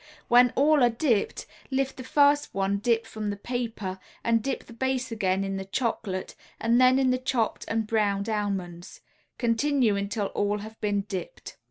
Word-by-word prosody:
When 245 Hz, +1 st, +7 dB
all 295 Hz, +1 st, +4 dB
are 245 Hz, -, +6 dB
dipped, 230 Hz, -3 st, 0 dB, 0.2 s
lift 270 Hz, +1 st, -1 dB
the 255 Hz, -, -7 dB
first 290 Hz, 0 st, +3 dB
one 195 Hz, +1 st, 0 dB
dipped 230 Hz, +1 st, +1 dB
from 215 Hz, -2 st, -5 dB
the 205 Hz, -, -2 dB
paper 215 Hz, -4 st, -4 dB, 0.2 s
and 230 Hz, -1 st, +2 dB
dip 270 Hz, +4 st, -3 dB
the 235 Hz, -, -14 dB
base 260 Hz, +1 st, -1 dB
again 195 Hz, -3 st, 0 dB
in 195 Hz, 0 st, -3 dB
the 195 Hz, -, -5 dB
chocolate, 195 Hz, -3 st, -2 dB, 0.3 s
and 235 Hz, +2 st, +3 dB
then 255 Hz, +1 st, +6 dB
in 265 Hz, -1 st, +3 dB
the 255 Hz, -, +1 dB
chopped 255 Hz, -4 st, -1 dB
and 225 Hz, -1 st, -1 dB
browned 210 Hz, -2 st, 0 dB
almonds. 195 Hz, -5 st, -3 dB, 0.4 s
Continue 240 Hz, -1 st, +2 dB
until 200 Hz, +1 st, -2 dB
all 205 Hz, 0 st, 0 dB
have 220 Hz, +2 st, -10 dB
been 205 Hz, -1 st, +1 dB
dipped. 200 Hz, -, -7 dB
225 Hz, 175 wpm, -27 LUFS, 200-255 Hz, 0.4 s, When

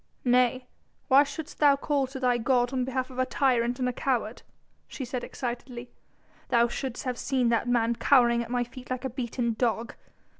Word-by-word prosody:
"Nay! 250 Hz, +1 st, +3 dB, 0.4 s
why 270 Hz, +1 st, +7 dB
shouldst 295 Hz, +3 st, -8 dB
thou 290 Hz, -2 st, +6 dB
call 280 Hz, -1 st, 0 dB
to 265 Hz, +1 st, -8 dB
thy 250 Hz, -2 st, +2 dB
god 245 Hz, +1 st, +1 dB
on 255 Hz, -1 st, 0 dB
behalf 260 Hz, 0 st, -3 dB
of 255 Hz, -, -7 dB
a 255 Hz, -, +3 dB
tyrant 245 Hz, -3 st, +1 dB
and 255 Hz, -1 st, -1 dB
a 250 Hz, -, -1 dB
coward," 240 Hz, -4 st, -2 dB, 0.5 s
she 265 Hz, -, -6 dB
said 250 Hz, 0 st, -4 dB
excitedly; 245 Hz, -1 st, -6 dB, 0.6 s
"thou 235 Hz, -1 st, +4 dB
shouldst 250 Hz, +1 st, -5 dB
have 250 Hz, -2 st, -3 dB
seen 255 Hz, -3 st, +1 dB
that 235 Hz, +1 st, +1 dB
man 235 Hz, -1 st, +2 dB
cowering 240 Hz, -3 st, +4 dB
at 235 Hz, -, -6 dB
my 245 Hz, 0 st, 0 dB
feet 250 Hz, +1 st, -12 dB
like 255 Hz, 0 st, -3 dB
a 265 Hz, -, -3 dB
beaten 235 Hz, -1 st, -2 dB
dog. 230 Hz, -1 st, 0 dB
250 Hz, 190 wpm, -27 LUFS, 240-265 Hz, 0.6 s, why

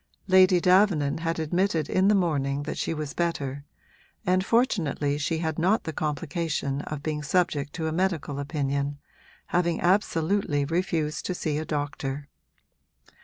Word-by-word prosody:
Lady 185 Hz, -1 st, +6 dB
Davenant 180 Hz, -6 st, +3 dB
had 165 Hz, 0 st, -1 dB
admitted 165 Hz, 0 st, 0 dB
in 190 Hz, +1 st, +2 dB
the 210 Hz, -, +5 dB
morning 145 Hz, -6 st, 0 dB
that 150 Hz, -, -4 dB
she -, -, -1 dB
was 155 Hz, -3 st, -4 dB
better, 145 Hz, -5 st, -2 dB, 0.6 s
and 185 Hz, +1 st, +2 dB
fortunately 175 Hz, -, +1 dB
she 160 Hz, +2 st, -1 dB
had 160 Hz, 0 st, -2 dB
not 190 Hz, +7 st, +2 dB
the 160 Hz, -, -4 dB
complication 150 Hz, -1 st, -2 dB
of 150 Hz, -1 st, -5 dB
being 155 Hz, -1 st, -2 dB
subject 150 Hz, -2 st, 0 dB
to 160 Hz, -, -3 dB
a -, -, -1 dB
medical 160 Hz, -5 st, -1 dB
opinion, 140 Hz, -1 st, -2 dB, 0.5 s
having 170 Hz, -2 st, +1 dB
absolutely 175 Hz, -4 st, +1 dB
refused 165 Hz, -1 st, -1 dB
to 180 Hz, -, -2 dB
see 155 Hz, -3 st, -1 dB
a 155 Hz, -, -4 dB
doctor. 145 Hz, -2 st, -3 dB
160 Hz, 145 wpm, -26 LUFS, 145-180 Hz, 0.6 s, Lady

